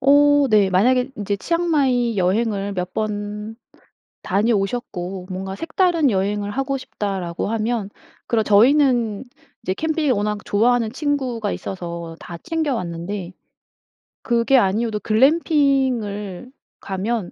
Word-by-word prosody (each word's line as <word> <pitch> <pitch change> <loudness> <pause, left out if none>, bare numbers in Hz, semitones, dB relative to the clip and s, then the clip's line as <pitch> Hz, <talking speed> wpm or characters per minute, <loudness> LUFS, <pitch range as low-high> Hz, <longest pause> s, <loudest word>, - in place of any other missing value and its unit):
어. 285 +1 +5
네 205 -3 +4
만약에 250 +8 +3
인제 205 -1 -2
치앙마이 270 - +1
여행을 200 +2 0
몇 180 0 -3
번 210 0 -4 0.7
다녀오셨고 195 -3 -1
'뭔가 190 +1 -4
색다른 330 - +1
여행을 205 +1 -1
하고 270 +4 -2
싶다.'라고 195 -9 -4
하면 220 -2 -1 0.4
그럼 225 -2 +1
저희는 240 0 +3 0.4
이제 185 - -2
캠핑을 315 +2 0
워낙 210 -1 -1
좋아하는 230 +1 +2
친구가 260 -7 -2
있어서 170 -3 -6
다 170 -1 -8
챙겨 320 - -2
왔는데 175 +1 -5 0.9
그게 235 +2 +3
아니어도 215 0 +1
글램핑을 255 - +1 0.3
가면 200 +1 -3
220 Hz, 265 characters per minute, -21 LUFS, 195-265 Hz, 0.9 s, 어